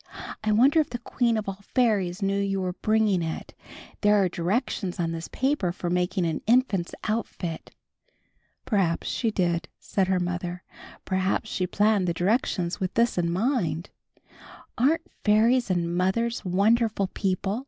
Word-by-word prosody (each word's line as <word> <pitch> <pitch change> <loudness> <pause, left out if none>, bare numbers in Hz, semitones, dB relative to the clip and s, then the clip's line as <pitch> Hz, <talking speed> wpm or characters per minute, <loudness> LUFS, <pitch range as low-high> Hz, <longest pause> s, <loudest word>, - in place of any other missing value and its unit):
I 215 - +1
wonder 265 +9 +5
if 310 - +1
the 240 - -4
Queen 235 -1 0
of 215 - -3
All 195 0 -6
Fairies 205 -7 +2
knew 195 0 +1
you 195 -1 -1
were 185 -1 -2
bringing 215 -2 +1
it? 160 -1 -5 0.5
There 210 0 +5
are 195 -3 +3
directions 185 +1 -2
on 165 -1 0
this 165 0 -5
paper 265 -9 0
for 175 -1 -4
making 180 +1 0
an 160 -2 -2
infant's 225 -7 +2
outfit." 205 -6 -3 1.0
"Perhaps 190 -7 +1
she 230 - 0
did," 170 -4 0
said 190 -2 -1
her 185 -1 +2
mother. 175 0 -3 0.4
"Perhaps 190 +3 -1
she 185 - -1
planned 205 -1 +2
the 170 - 0
directions 180 -2 0
with 185 -1 -3
this 235 +1 +2
in 170 -1 0
mind." 180 - -1 0.8
"Aren't 315 +7 +2 0.2
fairies 225 +3 +3
and 170 -2 0
mothers 230 +7 0
wonderful 210 +3 +2
people?" 195 +2 -2
195 Hz, 155 wpm, -26 LUFS, 180-225 Hz, 1.0 s, wonder